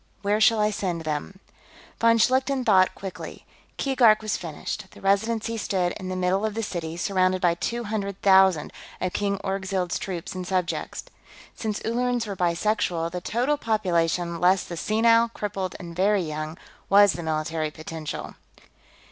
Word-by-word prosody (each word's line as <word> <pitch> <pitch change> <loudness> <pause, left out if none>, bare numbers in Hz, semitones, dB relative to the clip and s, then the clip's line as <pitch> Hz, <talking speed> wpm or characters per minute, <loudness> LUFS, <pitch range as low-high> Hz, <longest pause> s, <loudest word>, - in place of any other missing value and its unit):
Where 205 +2 +1
shall 225 0 +5
I 210 0 +2
send 180 -5 -3
them?" 155 +5 -4 0.6
Von 230 0 +5
Schlichten 260 +2 +2
thought 190 -4 +4
quickly. 195 -2 -8 0.3
Keegark 240 -6 +4
was 215 - -1
finished; 175 +4 -5
the - - -15
Residency 220 +3 0
stood 185 -4 0
in 185 -2 -6
the 185 - -3
middle 185 +2 +1
of 215 -1 -1
the 225 - -2
city, 170 -5 -4
surrounded 185 0 +1
by 175 -2 +3
two 235 +7 -3
hundred 200 -3 -3
thousand 190 -5 +5 0.3
of 185 -1 -2
King 200 -1 0
Orgzild's 190 -2 -2
troops 180 -4 -5
and 185 -1 -5
subjects. 185 -3 -2 0.5
Since 215 -2 -3
Ullerans 245 0 0
were 200 -2 -5
bisexual, 175 -1 0
the 180 0 -4
total 250 +10 0
population, 175 - 0
less 180 +2 +4
the 170 - -7
senile, 230 +5 +3
crippled, 195 -3 -3
and 170 -1 -8
very 195 +1 +2
young, 155 +1 -5 0.3
was 200 -2 +6
the 175 - -5
military 155 0 -2
potential. 155 0 -7
190 Hz, 155 wpm, -25 LUFS, 175-215 Hz, 0.6 s, was